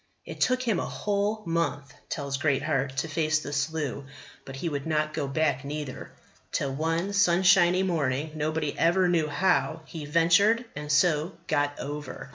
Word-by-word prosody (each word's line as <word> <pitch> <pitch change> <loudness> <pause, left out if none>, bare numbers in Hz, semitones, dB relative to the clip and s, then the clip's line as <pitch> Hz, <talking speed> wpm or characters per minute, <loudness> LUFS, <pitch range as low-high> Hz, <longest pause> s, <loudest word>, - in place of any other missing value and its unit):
"It - - -9
took 255 0 +2
him 225 -7 +1
a - - -2
whole 210 +1 -1
month," 165 -5 -2 0.2
tells 140 -3 -3
Greatheart, 135 -1 0
"to 160 - 0
face 155 0 +1
the 145 -2 -5
Slough. 145 -2 -2 0.4
But 135 - -8
he 150 +6 -4
would 145 -2 -3
not 155 -1 0
go 150 -3 -2
back 140 -2 0
neither. 145 -1 -6 0.4
Till, 135 -1 -1
one 165 +6 -1
sunshiny 185 -1 +4
morning, 155 -4 -1
nobody 155 -1 -2
ever 180 +2 +3
knew 165 -3 +2
how, 160 -2 +1
he 155 -3 -8
ventured, 175 +9 +4
and 150 0 -4
so 155 +3 +2
got 145 -2 0
over. 145 -2 -6
155 Hz, 160 wpm, -27 LUFS, 145-175 Hz, 0.4 s, sunshiny